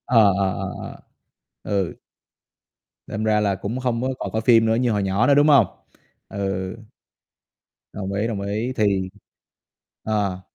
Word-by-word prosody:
Ờ, 110 -5 +5
ờ, 100 -1 +1
ờ, 95 -2 -4 0.9
ờ, - - -4
ừ. 95 -4 -1 1.1
Đâm 110 - -4
ra 110 -1 +2
là 100 -2 +1
cũng 110 +6 -4
không 125 -2 -1
có 130 - -1
còn - - -4
coi 110 - -1
phim 115 0 +5
nữa 110 0 +2
như 120 0 +1
hồi 105 -2 0
nhỏ 95 +5 +1
nữa, 140 - +5
đúng 145 +1 +5
hông? 140 -7 +6 0.6
Ừ. 95 -1 -3 1.2
Đồng 95 -1 -4
ý, 105 +3 0
đồng 105 -4 -3
ý, 105 +5 -2
thì 100 -4 +1 1.0
à. 100 -4 -1
105 Hz, 160 wpm, -22 LUFS, 100-115 Hz, 1.2 s, hông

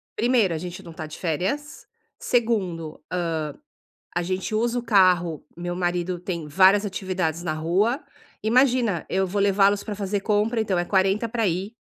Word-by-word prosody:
Primeiro, 230 -7 +2
a - - -2
gente 180 +3 -7
não 170 -3 -10
tá 160 - -6
de 155 - -9
férias. 190 - -3 0.3
Segundo, 205 - -1
hã, 180 -1 -1 0.9
a 175 - 0
gente 185 +4 -3
usa 235 +2 +1
o - - -3
carro 185 -7 +3
meu 175 0 -4
marido 175 0 -1
tem 170 -3 -4
várias 195 +6 +5
atividades 185 -4 -2
na 170 - -1
rua. 195 - +1 0.4
Imagina, 240 - +2
eu 190 0 +1
vou 200 +2 -2
levá-los 200 0 +3
pra 210 - -4
fazer 200 0 -2
compra, 215 +3 +1
então 195 -5 0
é 175 - +1
40 195 +4 +1
pra 225 -1 0
ir 190 +6 -3
190 Hz, 165 wpm, -24 LUFS, 175-220 Hz, 0.9 s, várias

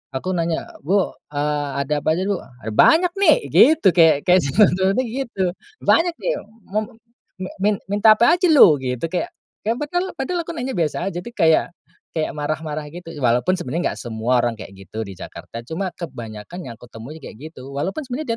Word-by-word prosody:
Aku 185 +8 -2
nanya, 170 -2 -2
"Bu, 190 +6 +1 0.2
eee, 145 0 -1
ada 150 +2 -1
apa 155 +2 +1
aja, 185 - -1
Bu? 200 -2 -1 0.2
Ada 110 - -4
banyak 335 - +5
nih," 400 - +6 0.2
gitu. 305 -10 +6
Kayak 160 -4 +4
kayak 180 0 +5
sinetronnya 190 - +3
gitu, 230 -7 -2 0.3
"Banyak 335 0 +3
nih, - - -2 0.4
mau 215 +1 -1 0.7
mi 205 +2 +3 0.2
minta 215 +1 +6
apa 240 +11 +4
aja 360 - +3
lu?" 190 - +7
Gitu. 125 0 -4 0.6
Ya, 225 - +3 0.4
padahal 350 +7 -2
aku 335 - -5
nanya 255 0 -3
biasa 170 +3 -1
aja, 175 - -4
jadi 210 - -8
kayak 160 -4 +4 0.7
marah-marah 155 0 -4
gitu. 165 +1 -10
Walaupun 125 +9 +2
sebenarnya 170 +2 -2
enggak - - -10
semua 120 +1 0
orang 120 -2 -1
kayak 100 - -10
gitu 110 0 -5
di 100 - -8
Jakarta, 115 +5 -9
cuma 185 +3 -3
kebanyakan 120 - -8
yang 120 - -7
kutemui 120 +6 -10
kayak 120 - -10
gitu. 130 -3 -11
Walaupun 160 - -3
sebenarnya 255 -1 -3
170 Hz, 170 wpm, -21 LUFS, 140-210 Hz, 0.7 s, lu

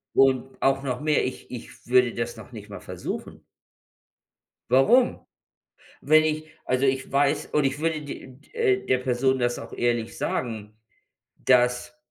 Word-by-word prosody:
und 135 0 +2
auch 135 0 +2
noch 125 -2 -2
mehr, 150 -1 +2
ich 130 - -6
ich 125 -2 -10
würde 125 -1 +4
das 120 0 -3
noch 110 - -12
nicht 105 -3 -10
mal 100 - -8
versuchen. - - -7 1.3
Warum? 235 - +4 0.8
Wenn 155 0 +5
ich 155 0 -1 0.2
also, 130 +2 +1
ich 135 -1 0
weiß 140 0 +2
und 150 - +1
ich 135 +2 -1
würde 160 -1 -1
d 145 -2 -8
d 130 +1 -18
äh, 430 -5 +1
der 130 -1 +2
Person 130 +1 +1
das 120 0 0
auch - - -10
ehrlich 120 -1 -1
sagen, 110 -3 -3 0.6
dass 125 -1 +2
130 Hz, 155 wpm, -25 LUFS, 120-140 Hz, 1.3 s, Wenn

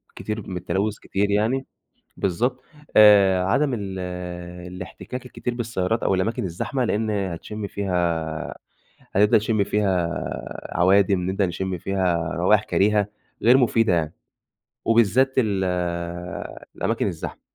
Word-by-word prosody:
كتير 105 0 -5
من 90 -2 -4
التلوث 95 +4 -1
كتير 100 +1 -1
يعني. 115 +6 +1 0.5
بالضبط. 120 +8 0 0.4
آآ، 100 -3 +7
عدم 135 +8 +2
ال 95 -3 -5 0.7
الاحتكاك 125 +7 -8
الكتير 125 -1 -4
بالسيارات، 115 -3 -1
أو - - +2
الأماكن 100 +5 -1
الزحمة، 95 +9 -2
لإن 110 0 0
هتشم 100 +1 -3
فيها 85 -5 -2 0.6
هتبدأ 105 +3 +5
تشم 110 -1 +1
فيها 95 -4 +1 0.7
عوادم، 95 +1 +4
نبدأ 95 +1 +1
نشم 90 +1 -3
فيها 90 -3 0
روايح 100 +4 +3
كريهة 105 -1 +2 0.3
غير 125 +3 +6
مفيدة 115 -5 +3
يعني. 80 -3 0 0.7
وبالذات 115 +4 +3
ال 100 -6 +1 1.1
الأماكن - - 0
الزحمة. - - -5
100 Hz, 115 wpm, -23 LUFS, 95-110 Hz, 1.1 s, آآ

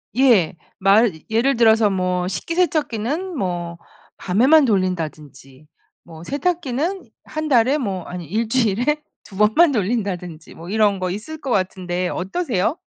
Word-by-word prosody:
예. 235 -12 +4 0.2
말 200 +3 +4 0.2
예를 235 +3 +1
들어서 220 -2 +4
뭐 180 -1 -1
식기세척기는 315 - -1
뭐 175 -3 -3 0.4
밤에만 265 +11 +4
돌린다든지 155 - -3 0.4
뭐 165 -1 -12
세탁기는 325 - -2 0.2
1 310 0 -4
달에 255 +3 +3
뭐 195 - -3
아니 180 -2 -7
1 220 +7 -2
주일에 245 +5 +1 0.2
2 195 - -14
번만 220 +10 +4
돌린다든지 190 - -3
뭐 170 +2 -10
이런 205 -2 +2
거 185 -1 -2
있을 300 +11 -7
것 270 - -5
같은데 185 -2 -1
어떠세요? 220 - -2
215 Hz, 265 characters per minute, -20 LUFS, 180-275 Hz, 0.4 s, 예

